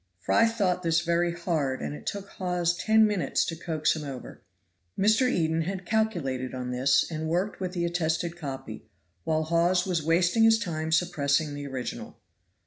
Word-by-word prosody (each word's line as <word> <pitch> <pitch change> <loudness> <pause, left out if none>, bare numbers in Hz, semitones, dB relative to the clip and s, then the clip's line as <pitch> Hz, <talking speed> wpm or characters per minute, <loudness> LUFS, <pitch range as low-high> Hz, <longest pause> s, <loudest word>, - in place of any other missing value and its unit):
Fry 225 - +3
thought 195 -6 0
this 165 -2 +2
very 170 0 +1
hard, 165 -6 -1
and - - -4
it - - -10
took 200 -1 -4
Hawes 180 -2 -1
ten 220 +4 +4
minutes 205 -3 0
to 165 - -3
coax 160 -2 0
him 155 - -5
over. 135 -3 -8 0.6
Mr. 220 +6 +3
Eden 160 -5 +1
had 185 +2 -4
calculated 165 - -1
on 125 -1 -4
this, 130 +2 +3
and 160 0 -3
worked 180 +5 -1
with 185 -1 -3
the 175 -2 -1
attested 170 0 -1
copy, 135 -9 -7 0.4
while 160 -1 +1
Hawes 170 +3 +2
was 180 -4 0
wasting 175 +7 +2
his 225 0 +6
time 160 -7 -3
suppressing 155 -3 +1
the 145 0 -6
original. 130 - -6
170 Hz, 170 wpm, -27 LUFS, 150-180 Hz, 0.6 s, his